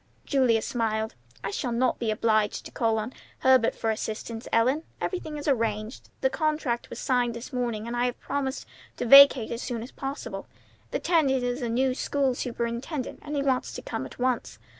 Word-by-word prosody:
Julia 250 -6 +3
smiled. 220 -2 -1 0.3
"I 195 - -2
shall 245 +4 -2
not 245 +2 +1
be 230 - -1
obliged 215 -1 +1
to - - -9
call 225 -2 +1
on 220 +4 -3 0.3
Herbert 260 -3 +4
for 225 - 0
assistance, 220 +1 -4
Ellen. 255 +7 +3 0.2
Everything 315 -5 -3
is 290 - -6
arranged. 225 -3 -1
The 265 - +3
contract 300 -6 -1
was - - -7
signed 245 -2 +1
this 235 +4 -8
morning, 235 -4 -2
and 235 +1 -4
I 240 +1 +1
have 245 - -4
promised 270 -1 -3 0.3
to - - -2
vacate 275 -2 +8
as 235 +1 -3
soon 235 -3 -3
as 245 - -10
possible. 275 +1 -5 0.4
The - - -1
tenant 280 - +2
is 245 +1 -1
the 240 -3 -2
new 255 +3 +2
school 270 0 0
superintendent, 245 +3 -3
and 295 0 -5
he 280 - 0
wants 260 -2 0
to - - -7
come - - -4
at - - -14
once. 250 -1 -1
245 Hz, 190 wpm, -27 LUFS, 230-270 Hz, 0.4 s, vacate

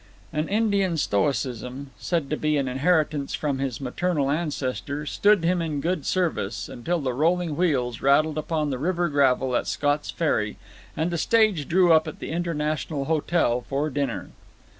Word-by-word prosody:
An 155 +1 -1
Indian 200 -5 +1
stoicism 125 +2 -1
said 165 -5 -1
to - - +2
be 155 0 0
an 140 -2 0
inheritance 150 +1 +1
from 140 -3 -2
his 135 -4 -2
maternal 140 +1 -1
ancestor 145 -2 -2
stood 205 +3 +3
him 175 +1 +2
in 155 -3 -2
good 170 -1 -2
service, 115 - -1
until 170 +9 -2
the 130 -4 -2
rolling 165 +3 +1
wheels 130 -9 0
rattled 155 +3 +3
upon 155 -2 -1
the 130 - -3
river 175 +2 0
gravel 130 -3 +2
at - - 0
Scott's 145 0 0
Ferry, 110 -10 0 0.4
and 160 +3 0
the 170 - -1
stage 215 -8 +2
drew 175 0 +5
up 160 0 +4
at 155 - -6
the - - -6
International 155 -3 -2
Hotel 155 -5 +1
for 145 +2 -1
dinner. 140 -3 -3
150 Hz, 160 wpm, -25 LUFS, 135-170 Hz, 0.4 s, drew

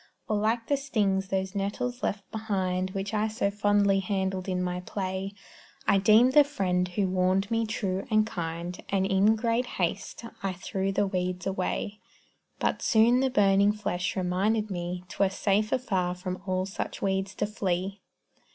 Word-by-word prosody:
Or 215 - 0
like 225 +3 +1
the 285 - +1
stings 205 -8 0
those 190 0 -2
nettles 230 +5 -2
left 200 0 -2
behind 190 -4 -1
Which 195 +2 -4
I 215 0 +1
so 215 -2 -1
fondly 205 -1 +3
handled 190 -1 -2
in 180 -1 0
my 180 0 -2
play; 190 +1 -4 0.5
I 195 - +5
deemed 220 +6 +5
the 295 - +8
friend 185 -10 0
who 190 +2 0
warned 185 +3 +1
me 225 -1 +1
true 195 -3 -2
and 215 0 +4
kind, 170 -3 -5
And 195 -1 +1
in 195 +3 +4
great 230 +2 0
haste 190 +5 -2 0.2
I 195 -1 -1
threw 190 +1 -2
the 200 +1 +1
weeds 180 -2 -2
away, 195 +2 -2 0.6
But - - -1
soon 235 +2 +4
the 265 0 +2
burning 200 -3 +4
flesh 185 -3 -2
reminded 200 +4 0
me 175 0 -4
'Twere 195 +2 +1
safer 205 +4 +1
far 185 -8 -1
from 185 0 -5
all 185 0 0
such 195 - -5
weeds 190 0 -1
to - - 0
flee. 195 -2 -2
195 Hz, 165 wpm, -28 LUFS, 185-215 Hz, 0.6 s, the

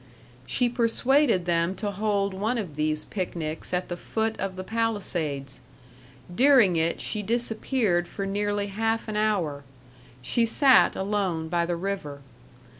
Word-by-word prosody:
She 245 - +2
persuaded 240 - +2
them 170 +1 +1
to 205 0 -3
hold 200 -1 0
one 215 +6 -1
of 185 -10 -5
these 155 0 0
picnics 165 -5 -4
at 180 0 -1
the 175 - -4
foot 220 +5 -2
of 195 -1 -3
the 185 - -5
Palisades. 180 - -2 0.7
During 245 -5 +5
it 165 +1 0
she 210 - -2
disappeared 220 -4 0
for 195 +3 -5
nearly 205 +1 -1
half 225 +3 -1
an 215 - -4
hour. 185 -10 0 0.6
She 235 - +1
sat 260 +4 +5
alone 190 -5 -1
by 170 0 0
the 175 - -1
river. 170 -6 -4
200 Hz, 140 wpm, -26 LUFS, 170-225 Hz, 0.7 s, During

